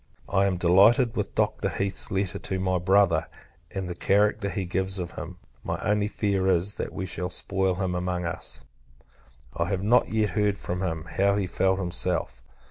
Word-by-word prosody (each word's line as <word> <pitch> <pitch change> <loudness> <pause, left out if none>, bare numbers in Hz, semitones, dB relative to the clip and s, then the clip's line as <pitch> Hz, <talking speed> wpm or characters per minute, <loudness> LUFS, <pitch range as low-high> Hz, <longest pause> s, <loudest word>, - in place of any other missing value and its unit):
I 100 0 +2
am 95 -2 0
delighted 100 +8 +5
with - - -3
Dr. - - 0
Heath's 100 -1 -2
letter 95 -2 -1
to 95 - -3
my 95 -1 0
Brother, 90 -3 +3 0.4
and 95 -2 -4
the 90 - -4
character 100 +3 +2
he 95 -1 -3
gives 95 +2 -1
of 90 -2 -4
him. - - -8 0.3
My - - -2
only 105 0 +1
fear 100 -3 0
is, 95 +2 +1
that - - -4
we 95 - -4
shall 90 0 -3
spoil 95 +1 0
him 95 -1 -2
among 90 0 -2
us. 85 - -3 0.9
I 85 - 0
have 95 +1 -2
not 120 +4 +4
yet 110 -1 +1
heard 105 -1 +1
from 90 -1 -4
him, 80 -4 -2
how 100 +3 +1
he 100 -1 0
felt 95 +1 +1
himself. 85 -9 -1
95 Hz, 185 wpm, -26 LUFS, 90-100 Hz, 0.9 s, delighted